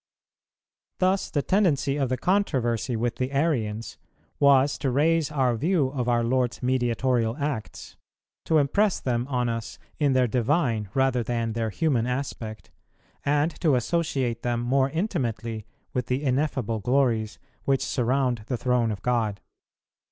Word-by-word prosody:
Thus 190 +1 +1
the 145 - -1
tendency 160 -8 +2
of 135 -3 0
the 130 - 0
controversy 130 - 0
with 115 +1 -1
the 130 +1 -2
Arians 120 -7 -1 0.4
was 140 0 +4
to 135 - 0
raise 155 +4 +2
our 130 -5 +1
view 155 - +1
of 125 -3 -2
our 120 -1 +2
Lord's 125 +1 0
Mediatorial 120 -1 +1
acts, 145 -7 -5 0.5
to 160 - +3
impress 185 +8 +2
them 120 -1 -1
on 125 -3 0
us 115 -1 -4 0.2
in 145 -3 +3
their 130 -1 +4
divine 120 - 0
rather 130 -2 +2
than 115 -1 -2
their 115 -1 -1
human 125 -2 0
aspect, 125 -4 -5 0.5
and 145 +3 +2
to 155 -7 +4
associate 125 -3 -1
them 120 -1 -1
more 130 +2 +2
intimately 115 - -3 0.3
with 125 -2 -2
the 130 +3 -1
ineffable 130 -5 0
glories 115 -2 +1 0.3
which 135 -1 +1
surround 125 0 0
the 125 - -1
Throne 125 -1 +1
of 100 -3 -6
God. 115 -5 0
130 Hz, 145 wpm, -26 LUFS, 115-140 Hz, 0.5 s, was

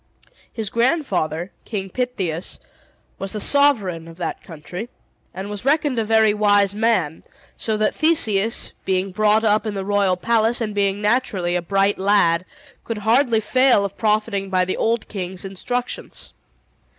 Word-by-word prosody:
His 220 -4 -4
grandfather, 195 - 0
King 195 -4 -5
Pittheus, 195 -10 -3 0.6
was 195 0 -4
the 215 - -3
sovereign 205 - +2
of 165 0 -12
that 175 -3 -4
country, 175 +7 -8 0.4
and 190 +1 -6
was 205 0 -6
reckoned 280 -2 +1
a - - +1
very 220 -1 +3
wise 205 -2 +3
man; 205 -8 0 0.3
so 220 -1 -2
that 215 - +1
Theseus, 225 -10 +1
being 190 0 -1
brought 215 +2 +2
up 215 0 +2
in 210 - -3
the 195 -1 -4
royal 200 -2 +2
palace, 230 +4 +1
and 215 -3 -3
being 200 0 0
naturally 210 -6 +1
a 180 - 0
bright 195 +3 +1
lad, 185 -3 +3 0.4
could 230 - -4
hardly 235 0 +3
fail 255 -1 +3
of 200 0 -5
profiting 210 -2 0
by 185 -1 +2
the 185 - -2
old 230 0 0
king's 185 -2 -6
instructions. 245 +6 -5
205 Hz, 150 wpm, -21 LUFS, 190-230 Hz, 0.6 s, very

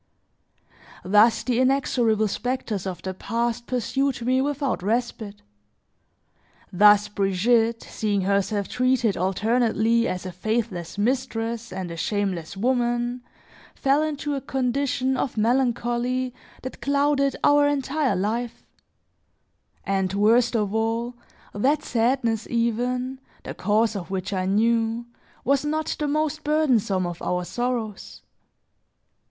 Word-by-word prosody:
Thus, 210 +4 +4
the 245 -2 0
inexorable 245 -5 +2
specters 220 -3 -3
of 180 -2 -6
the 190 - -3
past 235 +4 -2
pursued 260 +1 -1
me 255 +1 +2
without 280 -4 -1
respite; 215 0 -2 1.3
thus, 205 +2 +6
Brigitte 225 +4 +1
seeing 205 -2 -1
herself 200 +1 0
treated 250 -4 +1
alternately, 225 +4 +1
as 180 0 -4
a 185 - -4
faithless 190 -2 -3
mistress 235 0 -1
and 185 -2 -5
a 165 - -7
shameless 195 -2 -2
woman, 240 +1 0 0.5
fell 275 +2 +2
into 295 -1 -2
a 275 - -2
condition 265 0 -1
of 250 - -2
melancholy 245 +1 0 0.3
that 260 - -7
clouded 280 0 +1
our 290 0 +5
entire 285 -3 0
life; 225 +5 -3 1.2
and 195 -1 -1
worst 230 +4 +3
of 210 -2 0
all, 225 +2 -1 0.4
that 275 +9 +1
sadness 230 -2 0
even, 245 +3 -1 0.2
the - - -6
cause 215 +1 +1
of 190 -3 -5
which 190 +1 -3
I 185 -1 -1
knew, 225 +3 +1 0.4
was 275 +1 +2
not 310 +1 -1
the 300 - 0
most 305 +1 -1
burdensome 255 - +2
of 175 -1 -5
our 180 0 -1
sorrows. 240 -2 -4
235 Hz, 115 wpm, -24 LUFS, 205-260 Hz, 1.3 s, thus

